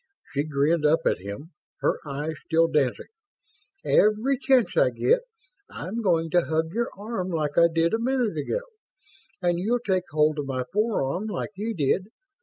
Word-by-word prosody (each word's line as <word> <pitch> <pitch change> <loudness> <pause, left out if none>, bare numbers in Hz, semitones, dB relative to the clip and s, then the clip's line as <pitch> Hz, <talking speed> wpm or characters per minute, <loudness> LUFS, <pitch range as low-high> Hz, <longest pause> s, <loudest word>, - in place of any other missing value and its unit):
She 145 +1 0
grinned 150 +2 +1
up 155 +2 +4
at - - +2
him, 100 - -8 0.3
her - - +1
eyes 145 +3 -3
still 165 +1 +3
dancing. 150 -6 0 0.8
"Every 220 +6 +3
chance 265 -3 +3
I - - +4
get, 485 0 +2 0.5
I'm 215 +7 -5
going 165 -5 +1
to 175 - +4
hug 160 +2 -1
your 235 +2 -1
arm 205 -3 -4
like 155 -4 -2
I 170 0 +6
did 165 +2 +1
a 225 - +2
minute 245 -5 0
ago. 155 - -2 0.8
And 175 -1 +2
you'll 225 +7 +1
take 190 -6 -1
hold 155 0 +2
of 145 - -3
my 130 -2 -2
forearm, 210 -4 0
like 210 - -4
you 220 +3 -3
did! 165 +6 +1
170 Hz, 170 wpm, -25 LUFS, 150-220 Hz, 0.8 s, I